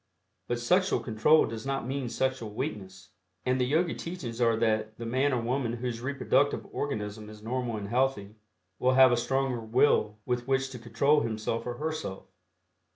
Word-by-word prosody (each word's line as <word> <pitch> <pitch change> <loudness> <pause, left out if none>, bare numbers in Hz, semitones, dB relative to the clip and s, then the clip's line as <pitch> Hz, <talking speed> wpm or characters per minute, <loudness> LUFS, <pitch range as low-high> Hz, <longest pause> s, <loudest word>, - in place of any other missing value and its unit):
But 120 - -1
sexual 180 +10 +2
control 120 +8 +4
does 115 -1 -6
not 135 -2 -2
mean 130 -1 -3
sexual 130 -3 -1
weakness, 95 -3 -6 0.4
and 130 0 +1
the - - +3
Yogi 165 +5 +2
teachings 130 -9 -6
are 115 -1 +4
that 110 -1 0
the 115 - -6
man 130 +5 +1
or 125 - +1
woman 120 0 -1
whose 120 -1 -4
reproductive 140 +1 +1
organism 105 -6 -4
is 105 0 -12
normal 120 -1 -2
and 100 -1 -5
healthy, 120 -3 0 0.5
will 130 +1 +3
have 130 -1 +8
a - - +4
stronger 130 +1 0
will 110 -2 +2
with 125 0 -2
which 135 0 +1
to 125 - -7
control 130 +6 +2
himself 115 0 -2
or 120 - -3
herself. 155 -8 -4
120 Hz, 170 wpm, -29 LUFS, 110-135 Hz, 0.5 s, have